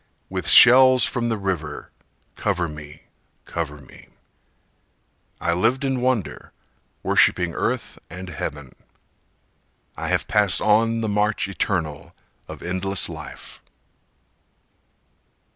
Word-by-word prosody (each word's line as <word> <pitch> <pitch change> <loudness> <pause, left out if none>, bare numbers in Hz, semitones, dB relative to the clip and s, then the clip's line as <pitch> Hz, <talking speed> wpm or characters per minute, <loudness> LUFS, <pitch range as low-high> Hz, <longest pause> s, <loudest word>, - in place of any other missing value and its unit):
With - - -4
shells 130 0 +7
from 120 0 -1
the 115 - -1
river 85 -7 -4 0.4
cover 85 0 -1
me, 75 -1 -11 0.4
cover 75 -3 -5
me. 70 - -16 1.3
I 85 - 0
lived 115 +10 +1
in 135 -2 -1
wonder, 125 -6 -2 0.5
worshipping 90 -2 +3
earth - - -3
and 90 0 -8
heaven. 75 -4 -6 1.2
I - - -5
have - - 0
passed 105 -3 +2
on 115 +2 +2
the 110 - -1
march 105 0 0
eternal 85 -4 -3 0.3
of - - -10
endless 95 +1 0
life. - - -10
95 Hz, 105 wpm, -22 LUFS, 85-115 Hz, 1.3 s, shells